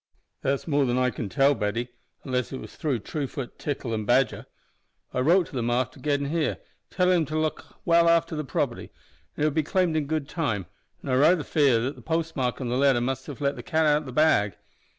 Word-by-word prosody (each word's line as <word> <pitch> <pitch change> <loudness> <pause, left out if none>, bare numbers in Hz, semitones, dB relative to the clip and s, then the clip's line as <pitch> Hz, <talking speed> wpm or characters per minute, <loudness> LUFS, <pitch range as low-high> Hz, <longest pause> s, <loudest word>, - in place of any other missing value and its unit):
"That's 135 +3 -1
more 145 -3 +2
than 125 0 0
I 125 0 +2
can 110 -2 -5
tell, 135 +9 +4
Betty, 115 +1 -2 0.3
unless 125 -2 -2
it 130 - -5
was - - -10
through 140 -8 -1
Truefoot, 135 +1 -5
Tickle, 130 -5 -3
and 110 -1 -3
Badger. 130 +2 +2 0.7
I - - -1
wrote 170 +7 +4
to - - -16
them 120 -2 -1
after 120 -1 -1
gettin' 140 -1 0
here, 165 -2 0 0.3
tellin' 180 -1 +3
them 165 - +1
to 155 +2 -3
look 155 0 -3
well 170 -1 +5
after 165 0 +2
the 155 - -2
property, 135 - -2 0.5
and - - -1
it - - +4
would 150 - -1
be 155 - +2
claimed 175 +1 +1
in 150 -2 0
good 155 -2 -2
time, 115 - -2 0.4
an' - - -6
I - - +1
raither 155 +5 +4
fear 140 -7 +3
that 130 +5 -2
the - - -13
postmark 160 -6 -1
on 130 - -3
the 125 - 0
letter 135 -2 +4
must 130 +2 -3
have 145 0 -8
let 140 0 +1
the - - -7
cat 160 0 +1
out 150 0 +3
o' - - -12
the 130 - -7
bag. 125 -8 +3
140 Hz, 230 wpm, -26 LUFS, 125-155 Hz, 0.7 s, well